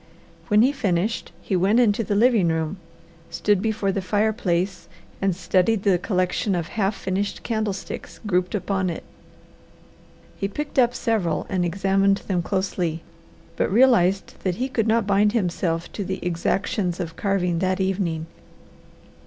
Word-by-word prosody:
When 210 0 +5
he 260 - +4
finished 205 -6 -1
he 190 - -1
went 195 +6 +3
into 225 -2 +3
the 205 0 -1
living 225 -4 +4
room, 160 +2 -1 0.5
stood 205 -2 +1
before 215 -2 0
the 195 - -2
fireplace, 190 -4 0 0.3
and 195 -2 +1
studied 190 +3 +1
the 190 -4 +3
collection 185 +1 0
of 170 -2 -3
half 200 -1 0
finished 195 +2 -3
candlesticks 220 -4 -4
grouped 180 -1 0
upon 190 -1 -1
it. 165 - -5 1.3
He 195 - -2
picked 290 +7 -3
up 245 -1 +3
several 225 -8 0
and 185 -3 0
examined 195 +2 +2
them 180 -3 +1
closely, 180 -3 -2 0.5
but - - 0
realized 200 -5 +3
that 185 -2 -1
he 255 +6 -2
could 230 -4 0
not 225 -1 +2
bind 205 +1 +3
himself 175 -5 -1
to 205 - -3
the 190 0 -3
exactions 180 +1 -1
of 165 -2 -4
carving 180 -4 0
that 185 +1 0
evening. 185 -4 -1
195 Hz, 145 wpm, -23 LUFS, 180-210 Hz, 1.3 s, When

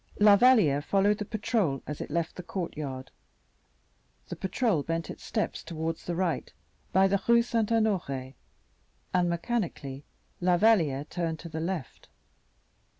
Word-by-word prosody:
La 205 -1 +8
Valliere 205 - +5
followed 200 +5 +2
the 210 - -3
patrol 205 - -1
as 150 - -5
it - - -5
left 165 +2 -2
the - - -6
courtyard. 150 -8 -5 1.2
The - - -4
patrol 190 - 0
bent 165 +2 -3
its - - -11
steps 215 - -2
towards 165 0 -4
the 175 - -2
right, 175 -2 -1 0.4
by 190 +1 +5
the 200 0 +1
Rue 235 0 +6
St. 230 -2 0
Honore, 175 - 0 0.8
and 180 -1 +2
mechanically 170 - -3 0.4
La 180 0 +3
Valliere 170 -10 +3
turned 165 -1 -3
to 170 - -8
the 160 0 -5
left. 165 -5 -5
175 Hz, 145 wpm, -28 LUFS, 155-210 Hz, 1.2 s, La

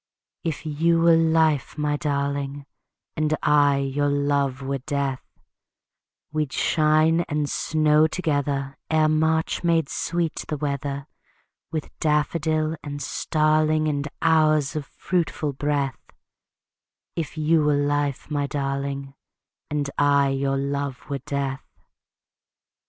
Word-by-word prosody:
If 160 -1 -3
you 165 +2 +2
were 165 0 +6
life, 160 -3 +2
my 150 -1 0
darling, 140 -2 -2 0.5
And 155 0 +1
I 145 -1 +4
your 140 +1 0
love 140 -2 0
were 135 0 -2
death, 140 -1 -2 1.1
We'd 155 -2 -1
shine 155 +1 +3
and 150 0 0
snow 155 +1 +3
together 145 -4 -2
Ere 155 -1 +3
March 160 +2 +1
made 165 -4 +2
sweet 170 -2 -2
the 150 - -2
weather 140 -1 -3 0.7
With 155 -2 -5
daffodil 155 +1 +1
and 145 -1 -5
starling 155 +1 +1
And 145 -1 -1 0.2
hours 155 -3 +3
of 150 -2 -3
fruitful 165 -5 -2
breath; 140 -1 -2 1.1
If 165 -1 -4
you 155 0 +3
were 150 -1 +3
life, 145 0 -1
my 145 -1 0
darling, 140 -1 -3 0.6
And 150 -1 -1
I 140 -1 +4
your 135 0 0
love 140 0 -3
were 140 - -1
death. 135 0 -3
145 Hz, 115 wpm, -24 LUFS, 140-155 Hz, 1.1 s, were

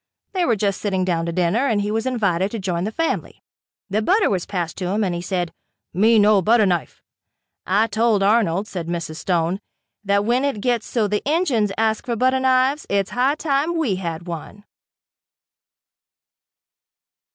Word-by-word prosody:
They 365 -2 +1
were 235 - +2
just 200 -1 -1
sitting 190 -3 0
down 170 -2 -1
to - - -1
dinner 185 +10 +1
and 220 -5 +1
he 205 +1 -1
was 225 +3 -1
invited 200 -7 0
to 230 - -5
join 180 -3 -2
the 215 - -3
family. 330 +8 -3 0.4
The 210 +2 0
butter 390 - +2
was 185 -3 -1
passed 175 -4 -3
to 185 - -3
him, 205 +4 0
and 185 -3 -1
he 175 - -3
said, 175 -1 -2 0.4
"Me 220 +5 +4
no 210 -1 +5
butter 220 +3 +4
knife." 175 -4 -2 0.6
"I 205 +4 +3
told 225 -2 +1
Arnold," 200 -2 +2
said 175 -5 -5
Mrs. 170 -2 -4
Stone, 175 +1 0 0.4
"that 200 0 +1
when 245 +4 +1
it 280 -7 -1
gets 240 0 -1
so 225 -4 0
the 210 +1 -1
Injuns 280 - +1
ask 220 0 0
for 240 - -1
butter 260 +3 +2
knives 260 +3 +2
it's 200 -1 0
high 260 +4 +1
time 310 +2 0
we 245 - 0
had 170 -2 -5
one." 175 +4 -8
210 Hz, 175 wpm, -21 LUFS, 185-240 Hz, 0.6 s, no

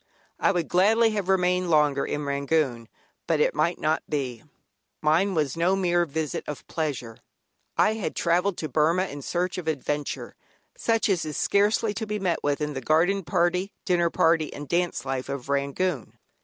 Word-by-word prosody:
I - - +3
would 175 -4 -1
gladly 220 +5 +4
have 205 -3 -3
remained 180 -1 +2
longer 150 -3 +3
in 150 0 -3
Rangoon, 140 -4 0 0.4
but - - +2
it - - +3
might 170 - +1
not 155 +1 0
be. 130 -6 -3 0.6
Mine 170 +6 +2
was 150 -5 0
no 175 +3 +2
mere 175 -2 +2
visit 155 0 -3
of 150 - -6
pleasure; 130 -8 -4 0.6
I 215 - +4
had 220 -3 -4
travelled 180 +3 +1
to 155 - -3
Burmah 160 +6 +2
in 145 0 -7
search 180 +5 -2
of 165 - -8
adventure, 145 -1 -3 0.4
such 225 -1 +1
as 190 -5 +1
is 155 -2 -4
scarcely 205 +1 +2
to 220 +1 -4
be 210 0 -2
met 185 -4 0
with 145 +1 0
in 150 0 -2
the 135 - -4
garden 175 +8 +2
party, 180 +4 0
dinner 175 -2 +2
party, 165 -2 +2
and 145 0 -8
dance 175 -6 -1
life 135 0 -3
of 140 -1 -5
Rangoon. 140 +2 -1
165 Hz, 175 wpm, -26 LUFS, 145-185 Hz, 0.6 s, gladly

